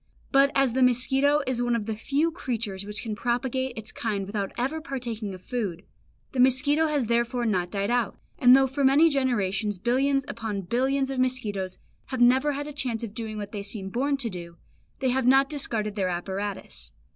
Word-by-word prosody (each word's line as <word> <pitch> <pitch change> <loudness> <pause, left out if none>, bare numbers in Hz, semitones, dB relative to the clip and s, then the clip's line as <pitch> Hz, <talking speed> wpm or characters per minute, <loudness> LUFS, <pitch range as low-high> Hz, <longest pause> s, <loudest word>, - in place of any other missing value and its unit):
But 275 0 +5
as 270 -3 +3
the 260 - +1
mosquito 265 +4 +3
is 255 -2 -1
one 240 -1 +1
of 220 -3 -2
the 220 - -2
few 290 +9 0
creatures 225 - -4
which 210 0 -3
can 220 -3 -3
propagate 245 +2 -1
its 220 -1 -5
kind 205 -4 -2
without 200 -1 -3
ever 275 +6 -1
partaking 235 -8 -4
of 185 - -14
food, 200 -8 -3 0.5
the 260 - -4
mosquito 280 +5 +4
has 295 -5 0
therefore 235 +1 0
not 180 -5 0
died 200 +2 -1
out; 245 0 0 0.2
and 250 -3 +8
though 270 0 +5
for 270 +2 -2
many 290 +5 +5
generations 210 -7 0
billions 270 +6 +1
upon 215 -3 -4
billions 265 +7 0
of 265 - -3
mosquitoes 210 -8 -1 0.3
have 260 - -4
never 260 +4 +4
had 285 +1 -4
a 295 - -7
chance 240 -5 -2
of 215 -3 -5
doing 220 -1 -5
what 205 -1 -6
they 205 - -4
seem 200 -1 -5
born 275 +6 0
to 250 -4 -1
do, 170 -2 -8 0.4
they 260 - +2
have 255 0 +1
not 270 +2 +5
discarded 220 -8 -1
their 190 -3 0
apparatus. 180 - -5
240 Hz, 195 wpm, -26 LUFS, 205-270 Hz, 0.5 s, and